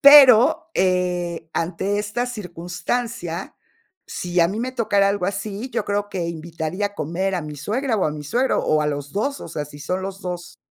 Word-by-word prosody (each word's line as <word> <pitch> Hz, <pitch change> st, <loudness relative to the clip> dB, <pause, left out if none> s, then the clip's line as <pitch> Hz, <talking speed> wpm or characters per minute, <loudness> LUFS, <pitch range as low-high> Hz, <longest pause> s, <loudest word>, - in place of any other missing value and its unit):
Pero, 285 Hz, +3 st, +8 dB
eh, 180 Hz, -3 st, 0 dB
ante 190 Hz, +4 st, -1 dB
esta 215 Hz, +4 st, -1 dB
circunstancia, 180 Hz, -1 st, -3 dB, 0.5 s
si 175 Hz, 0 st, -1 dB
a 170 Hz, -, +5 dB
mí 205 Hz, +3 st, -3 dB
me 255 Hz, +1 st, -2 dB
tocara 205 Hz, -5 st, +3 dB
algo 200 Hz, -2 st, 0 dB
así, 205 Hz, +4 st, -3 dB
yo -, -, -1 dB
creo 205 Hz, 0 st, -1 dB
que 180 Hz, -4 st, -2 dB
invitaría 170 Hz, +4 st, -3 dB
a 205 Hz, -, -9 dB
comer 185 Hz, +5 st, -1 dB
a 175 Hz, -, -1 dB
mi 150 Hz, -1 st, -7 dB
suegra 225 Hz, -, -1 dB
o 195 Hz, -, +1 dB
a -, -, 0 dB
mi 150 Hz, -1 st, -6 dB
suegro, 245 Hz, -, +2 dB
o 155 Hz, 0 st, +3 dB
a -, -, 0 dB
los 145 Hz, 0 st, -3 dB
2, 275 Hz, +8 st, -1 dB
o -, -, -7 dB
sea, 150 Hz, -2 st, -3 dB
si 145 Hz, 0 st, -12 dB
son 185 Hz, +5 st, -2 dB
los 195 Hz, +1 st, -5 dB
2 175 Hz, -1 st, -5 dB
190 Hz, 195 wpm, -23 LUFS, 170-215 Hz, 0.5 s, Pero